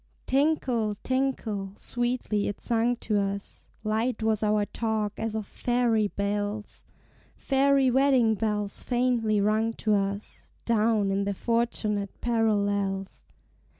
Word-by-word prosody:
Tinkle, 260 -6 +1
tinkle, 240 -7 -1
sweetly 240 -4 -1
it 205 - -4
sung 235 +1 +1
to 210 -2 +1
us, 200 0 -5 0.2
Light 220 +2 -1
was 220 -1 +1
our 210 -1 +2
talk 220 -2 -2
as 225 -1 -2
of 215 -2 -2
faery 235 -2 +1
bells 205 +1 -3 0.5
Faery 275 -1 +3
wedding 260 -3 +4
bells 210 -2 -2
faintly 240 -4 +1
rung 215 +2 +1
to 215 -1 0
us, 200 +1 -3 0.2
Down 220 -3 +2
in 195 +1 0
their 200 0 -1
fortunate 215 -3 -1
parallels. 200 -4 0
220 Hz, 115 wpm, -27 LUFS, 205-240 Hz, 0.5 s, wedding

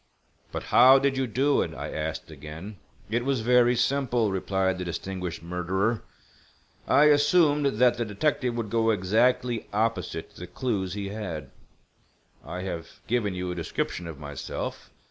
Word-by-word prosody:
"But - - -4
how 130 +3 +8
did 135 0 +1
you 130 -1 0
do 135 +5 +2
it?" - - -3
I - - -5
asked 80 0 -4
again. 80 +7 -9 0.3
"It 115 +2 +1
was 135 -2 0
very 125 +1 +4
simple," 120 -3 +1
replied 95 0 0
the - - -2
distinguished 90 0 -5
murderer. 95 +6 -1 0.9
"I 145 - +5
assumed 150 0 +4
that 125 -1 +3
the 120 - -1
detective 125 +3 0
would 115 -3 -3
go 115 -1 +2
exactly 115 +4 +1
opposite 105 -3 -2
to - - -15
the 90 - -7
clues 100 -8 -2
he 100 -1 -4
had. 100 -7 -5 0.9
I 90 - -6
have 85 -3 -4 0.2
given 110 -5 0
you 90 0 -3
a - - -4
description 85 +1 -3
of 80 -3 -7
myself. 75 -2 -6
110 Hz, 155 wpm, -27 LUFS, 90-125 Hz, 0.9 s, how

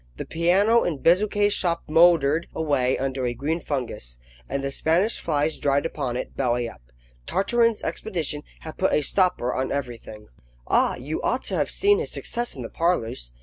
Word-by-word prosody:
The - - -5
piano 195 +8 +3
in 165 -4 -1
Bezuquet's 205 +3 +3
shop 170 -4 0
mouldered 160 -1 +4
away 140 -5 +1
under 130 -1 -2
a 120 - -3
green 155 +6 -1
fungus, 125 - -4 0.3
and 140 0 -2
the 140 - -2
Spanish 175 +10 +1
flies 150 -1 0
dried 140 +1 +1
upon 135 -6 -3
it, - - -6
belly 120 -2 0
up. 110 - -12 0.5
Tartarin's 230 +3 +1
expedition 165 -8 -3 0.2
had 160 - -7
a - - -31
put 190 - +1
a - - +3
stopper 180 -6 +1
on 130 +1 -2
everything. 120 -5 -6 0.4
Ah, - - +3
you 145 +6 -4
ought 250 +2 0
to - - -3
have - - 0
seen 410 +1 +3
his 460 - -3
success 240 0 -3
in 130 - -6
the 115 - -6
parlours. 115 - -1
155 Hz, 180 wpm, -24 LUFS, 130-180 Hz, 0.5 s, mouldered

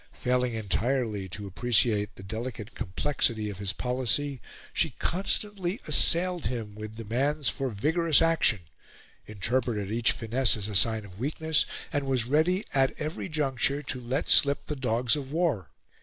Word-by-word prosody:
Failing 125 -1 0
entirely 110 -1 -1
to 100 +3 -7
appreciate 105 0 +1
the 95 - -12
delicate 110 +2 -6
complexity 110 0 -1
of 95 - -10
his 100 -1 0
policy, 130 +3 -1 0.3
she - - 0
constantly 195 +1 -1
assailed 175 +3 +4
him 115 -4 -5
with 110 +1 -8
demands 130 +6 -1
for 135 -1 -2
vigorous 155 - +2
action, 165 - +3 0.7
interpreted 110 -1 -2
each 115 +1 +2
finesse 120 +2 +2
as 105 -1 -4
a 105 - -5
sign 110 +1 +2
of 95 0 -13
weakness, 155 +4 +1 0.3
and 140 -1 -1
was 130 -3 +1
ready 160 - +1
at 135 -1 +1
every 155 +5 -4
juncture 140 -2 0
to 130 -1 -4
let 125 +4 -2
slip 140 0 +4
the 150 - -4
dogs 125 -2 +1
of 140 -2 -6
war. 155 - 0
125 Hz, 150 wpm, -28 LUFS, 110-145 Hz, 0.7 s, assailed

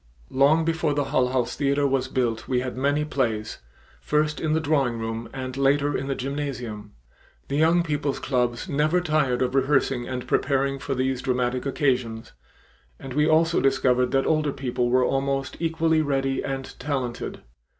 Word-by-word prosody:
Long 145 +5 +4
before 160 -3 0
the 145 - +1
Hull 125 -1 +3
House 125 -1 -1
theater 140 0 +1
was 135 -1 +1
built 120 -4 -1
we 125 -1 +1
had 130 -1 -4
many 145 +3 +1
plays, 115 -7 -2 0.4
first 150 0 0
in 155 -1 0
the 160 - +2
drawing 140 -6 +1
room 115 +1 -4
and 130 -1 -5
later 140 +1 +2
in 135 - -3
the 135 - -1
gymnasium. 125 -7 -5 0.6
The 140 - -1
young 165 +3 +4
people's 150 -3 -1
clubs 120 -3 -1
never 155 +5 +2
tired 150 -7 +1
of 125 - -1
rehearsing 135 -2 +1
and 130 -1 -5
preparing 135 0 +1
for 135 0 -3
these 130 0 -1
dramatic 125 0 -1
occasions, 125 -5 -1 0.7
and 135 - -8
we 150 +2 +2
also 165 0 +3
discovered 125 -2 +2
that 135 +1 +1
older 155 -2 +1
people 125 -3 -2
were 125 +1 +3
almost 135 0 -1
equally 160 -1 +1
ready 135 -2 0
and 135 -1 -4
talented. 130 -5 -4
135 Hz, 165 wpm, -25 LUFS, 125-150 Hz, 0.7 s, Long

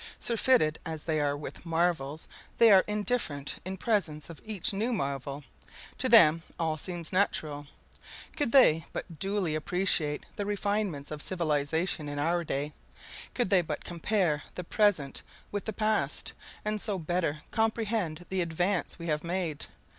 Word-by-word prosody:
Surfeited 230 -9 +2
as 160 -2 -5
they 155 -2 0
are 145 0 +1
with 145 - -8
marvels, 165 -3 0 0.3
they 230 -2 +7
are 190 -2 +8
indifferent 210 - -1
in 190 +1 -5
presence 175 -8 -1
of 165 - -12
each 215 -2 -1
new 220 +5 0
marvel. 140 - -3 0.6
To 260 - +1
them 165 -9 +7 0.2
all 160 -2 0
seems 175 -1 -4
natural. 150 -7 0 0.7
Could 290 -6 0
they 165 - +6
but 165 -3 -6
duly 195 -4 0
appreciate 155 -2 0
the 205 - -1
refinements 200 -8 -1
of 150 -1 -5
civilization 160 -1 0
in 145 - -5
our 170 +4 +1
day; 150 -1 -2 0.6
could 240 -6 0
they 190 -2 +6
but 155 -3 -5
compare 175 -3 0
the 180 - -4
present 180 -8 +2 0.3
with 205 -1 -3
the 220 - -2
past, 215 +1 0 0.3
and 210 -1 0
so 205 -3 +1
better 165 -3 -1
comprehend 220 -7 0
the 190 -1 0
advance 175 +3 -1
we 170 - -7
have 150 -2 -1
made! 170 -3 -2
175 Hz, 150 wpm, -29 LUFS, 155-205 Hz, 0.7 s, are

